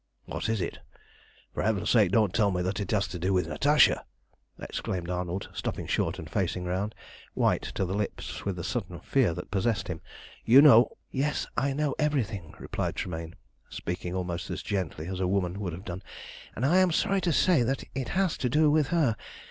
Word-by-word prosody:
"What - - -3
is 110 -3 0
it? 85 - -4 0.7
For - - -2
Heaven's 105 -3 +1
sake 105 -7 +5
don't 105 -3 +3
tell 105 -3 +3
me 90 -2 -1
that 95 +4 -2
it 100 - -3
has 100 -2 +1
to 90 - -5
do 95 +3 +1
with 90 -1 +1
Natasha!" 150 +1 +4 0.6
exclaimed 90 -1 -4
Arnold, 90 +1 -3
stopping - - -3
short - - 0
and - - -7
facing 90 - -1
round, 95 +4 -2 0.4
white - - +2
to 95 - 0
the 90 - -3
lips 105 0 -4
with 100 -2 -2
the 85 - -5
sudden 95 -6 -3
fear 120 -12 +2
that 90 - -7
possessed 100 0 0
him. 80 -3 -4 0.4
"You 125 +4 +7
know" 125 -5 +7
"Yes, 145 +3 0
I 135 +2 +1
know 145 -1 0
everything," 115 - -1
replied - - -3
Tremayne, 80 -1 -5 0.3
speaking 90 +1 -4
almost 90 +1 -3
as - - -4
gently 90 -6 -3
as 95 +1 -4
a 95 - +1
woman 95 0 0
would 95 -5 -3
have 90 +4 -8
done, 90 +1 -5 0.5
"and 125 - -1
I 170 +7 +4
am 185 -1 +4
sorry 195 +4 +1
to 175 - +1
say 170 -2 +4
that 130 +3 0
it 130 -1 -3
has 190 -4 +2
to 125 - -1
do 150 +3 +4
with 150 -2 +3
her. 150 -8 +2
100 Hz, 200 wpm, -28 LUFS, 90-135 Hz, 0.7 s, You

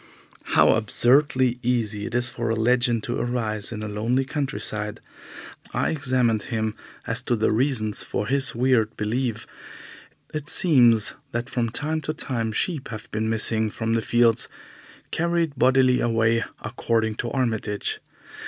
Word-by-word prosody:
How - - +6
absurdly 125 +3 +2
easy 110 -4 -1
it - - -6
is 120 0 +3
for 120 -2 -3
a 115 - +1
legend 120 0 +1
to - - -3
arise 110 -4 -2
in 110 -2 -5
a - - -4
lonely 115 +6 -1
countryside! 130 -7 -3 0.8
I - - 0
examined 125 -7 +1
him 110 -2 -2 0.3
as - - 0
to 120 - 0
the 110 -1 +1
reasons 110 -3 +1
for 105 - -3
his 135 +2 +4
weird 120 -3 +1
belief. 110 +1 -2 0.9
It 150 0 -4
seems 120 - +4 0.2
that 120 +2 -3
from 120 -2 -1
time 155 +7 -1
to 155 0 -4
time 115 -7 -2
sheep 145 - -1
have 110 -2 -9
been 110 +1 -2
missing 110 0 +3
from 115 +1 -3
the 115 - +1
fields, 115 0 +2 0.6
carried 170 -2 0
bodily 130 -1 +3
away, 115 0 +1 0.2
according 110 0 -1
to 120 - -3
Armitage. 110 -6 -2
120 Hz, 145 wpm, -24 LUFS, 110-130 Hz, 0.9 s, How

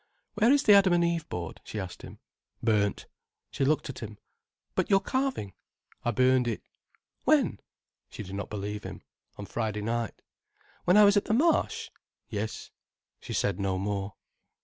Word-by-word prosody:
"Where 220 +4 +4
is 285 0 +4
the 210 - +7
Adam 195 -2 +6
and 175 0 +4
Eve 170 -2 -1
board?" 85 -2 -5
she 110 - -5
asked 95 -3 -6
him. - - -10 0.5
"Burnt." 105 -3 +1 0.5
She - - -1
looked 150 +3 +2
at 135 - -7
him. 105 -2 -8 0.6
"But - - 0
your 195 - +6
carving?" 260 - -2 0.5
"I - - 0
burned 130 +1 +3
it." 115 - -3 0.6
"When?" - - +3 0.5
She - - -7
did 95 -1 -9
not 100 0 -4
believe 105 0 -4
him. - - -8 0.3
"On 100 - -6
Friday 105 -1 -3
night." 115 0 -3 0.6
"When 180 +3 +5
I 210 - +9
was 205 0 +6
at 205 - +2
the 220 - +1
Marsh?" 325 +7 +2 0.4
"Yes." 110 0 -4 0.5
She - - -7
said 100 -2 0
no 95 -1 0
more. 100 0 -3
115 Hz, 170 wpm, -28 LUFS, -, 0.6 s, I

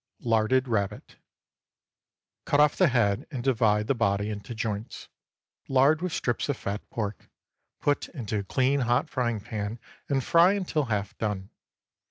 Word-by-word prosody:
LARDED 115 +3 +2
RABBIT. 100 -4 -2 1.3
Cut 145 - +2
off 150 0 +5
the 185 - +4
head 115 -7 +1
and 130 -6 -5
divide 110 -5 +2
the 135 - +2
body 100 -3 0
into 105 +3 -6
joints. 110 0 -4 0.6
Lard 140 +4 +4
with 180 -1 -2
slips 120 0 -1
of 140 - 0
fat 100 +2 -4
pork; 105 -3 -5 0.5
put 145 0 0
into 110 -8 -3
a - - -3
clean 130 +7 +1
hot 120 -1 +1
frying 120 -3 0
pan 105 0 -4 0.3
and 135 -2 +1
fry 170 +7 +5
until 180 -7 -1
half 105 -4 -2
done. 105 -3 -3
120 Hz, 150 wpm, -27 LUFS, 105-135 Hz, 1.3 s, off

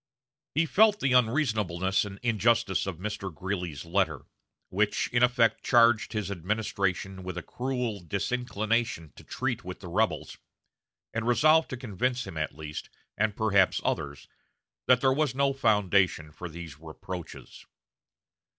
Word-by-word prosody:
He 160 +2 +3
felt 210 +5 +4
the 140 -2 +1
unreasonableness 110 - +2
and 100 -1 -8
injustice 110 -4 +2
of 95 -4 -4
Mr. 95 0 -4
Greeley's 90 -2 -4
letter, 95 +3 0 0.4
which 105 +3 +1
in 120 - +1
effect 120 -3 +3
charged 115 -2 +4
his 105 -3 -2
administration 95 0 -2
with 90 -1 -6
a 90 - -4
cruel 125 -4 -3
disinclination 110 - -2
to - - -13
treat - - -3
with 90 0 -7
the 90 - -9
rebels, 105 +5 -1 0.7
and 115 0 -2
resolved 155 +6 +4
to 130 - -5
convince 125 +2 -2
him - - -8
at 75 -2 -3
least, 75 -1 -7 0.3
and 105 -1 0
perhaps 100 -4 +3
others, 70 -3 -3 0.6
that 125 -1 +5
there 130 -1 +4
was 145 -2 0
no 140 0 +2
foundation 100 - +2
for 90 +4 -8
these 80 -3 -9
reproaches. 80 +2 -9
105 Hz, 140 wpm, -28 LUFS, 90-120 Hz, 0.7 s, that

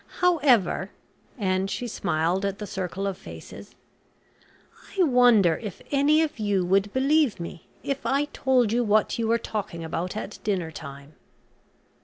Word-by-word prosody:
However," 265 - +3 0.5
and 190 -2 0
she 245 - -3
smiled 180 -3 -1
at 200 0 -1
the 210 - -6
circle 190 0 -4
of 195 -1 -3
faces, - - -11 1.2
"I 375 - +5
wonder 245 - +5
if 210 -6 -7
any 295 +3 +4
of 300 -6 -4
you 200 -3 +1
would 195 +2 +2
believe 275 - +2
me 170 0 -8 0.2
if 275 -1 -3
I 280 +2 +1
told 255 -5 +2
you 240 +1 +2
what 215 +1 +2
you 225 - 0
were 230 +1 +3
talking 205 -7 -5
about 170 +5 -3
at 210 - -6
dinner 185 -6 -1
time. 140 -1 -10
205 Hz, 150 wpm, -25 LUFS, 185-250 Hz, 1.2 s, I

